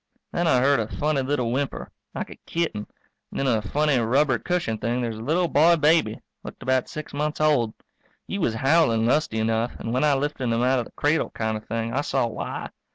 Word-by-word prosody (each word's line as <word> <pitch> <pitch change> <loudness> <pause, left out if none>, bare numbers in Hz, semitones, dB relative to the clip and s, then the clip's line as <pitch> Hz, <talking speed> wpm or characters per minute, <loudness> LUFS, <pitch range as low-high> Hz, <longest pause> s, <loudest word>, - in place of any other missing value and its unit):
Then 175 0 0
I 125 -6 +4
heard 140 0 +4
a 110 - -1
funny 150 +3 0
little 130 -3 -1
whimper, 135 +2 -3 0.2
like - - -4
a - - -9
kitten, 160 -12 -2 0.4
and - - -6
in - - 0
a 115 -5 +2
funny, 145 +5 +1
rubber 130 +2 +2
cushioned 165 -11 -2
thing 120 +2 0
there's 115 -3 -3
a - - -6
little 170 +6 +1
boy 165 +2 +5
baby, 150 -8 +2 0.2
looked - - -9
about 130 -1 +1
six 155 -1 -7
months 150 +1 -2
old. 140 -8 +2 0.5
He 200 - -3
was 120 - 0
howling 130 -3 +3
lusty 130 -2 +1
enough, 115 +2 0
and 115 - -4
when 130 - +1
I 150 -2 +4
lifted 140 -1 -2
him 115 0 +1
out 130 +1 +3
of 120 - -3
the - - -14
cradle 150 +2 +1
kind 110 -1 -2
of 110 - -8
thing, 115 +1 -2
I 140 - +1
saw 135 -3 0
why. 115 - -5
130 Hz, 220 wpm, -24 LUFS, 115-150 Hz, 0.5 s, boy